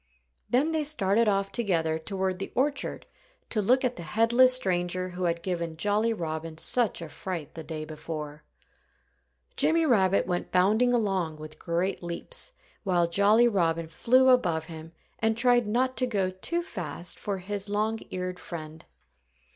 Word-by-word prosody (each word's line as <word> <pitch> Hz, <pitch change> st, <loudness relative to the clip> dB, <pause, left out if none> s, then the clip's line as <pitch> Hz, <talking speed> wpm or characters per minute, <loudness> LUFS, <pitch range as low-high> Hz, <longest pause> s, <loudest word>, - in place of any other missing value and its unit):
Then 275 Hz, +6 st, +2 dB
they 315 Hz, -1 st, 0 dB
started 230 Hz, -6 st, +2 dB
off 195 Hz, -1 st, +1 dB
together 165 Hz, -8 st, 0 dB
toward 190 Hz, +1 st, -3 dB
the 195 Hz, -, -5 dB
orchard 280 Hz, +3 st, -1 dB, 0.5 s
to 215 Hz, -, +1 dB
look 255 Hz, +6 st, +3 dB
at 250 Hz, 0 st, -2 dB
the -, -, -6 dB
headless 230 Hz, +8 st, +4 dB
stranger 185 Hz, -4 st, 0 dB
who 180 Hz, 0 st, -4 dB
had 170 Hz, 0 st, -1 dB
given 170 Hz, -3 st, -3 dB
Jolly 210 Hz, +5 st, +1 dB
Robin 160 Hz, -4 st, -4 dB
such 225 Hz, 0 st, +2 dB
a -, -, -6 dB
fright 165 Hz, 0 st, -6 dB
the 165 Hz, -, -7 dB
day 155 Hz, 0 st, -5 dB
before. 150 Hz, -1 st, -7 dB, 1.1 s
Jimmy 330 Hz, -7 st, +3 dB
Rabbit 200 Hz, -8 st, +3 dB
went 175 Hz, 0 st, -3 dB
bounding 215 Hz, +7 st, +3 dB
along 195 Hz, -9 st, 0 dB
with 155 Hz, 0 st, -11 dB
great 175 Hz, +3 st, -1 dB
leaps, 335 Hz, -, -2 dB, 0.3 s
while 175 Hz, -4 st, +2 dB
Jolly 205 Hz, +7 st, +4 dB
Robin 165 Hz, -6 st, 0 dB
flew 255 Hz, +10 st, +3 dB
above 175 Hz, -11 st, +2 dB
him 160 Hz, 0 st, -10 dB, 0.3 s
and 225 Hz, 0 st, +1 dB
tried 240 Hz, -1 st, +3 dB
not 255 Hz, +4 st, 0 dB
to 255 Hz, -, +1 dB
go 195 Hz, -5 st, 0 dB
too 340 Hz, -, -2 dB
fast 175 Hz, -, -6 dB
for 200 Hz, -2 st, -3 dB
his 200 Hz, +2 st, -4 dB
long 215 Hz, +2 st, 0 dB
eared 180 Hz, 0 st, -4 dB
friend. 155 Hz, -2 st, -8 dB
190 Hz, 155 wpm, -27 LUFS, 170-230 Hz, 1.1 s, headless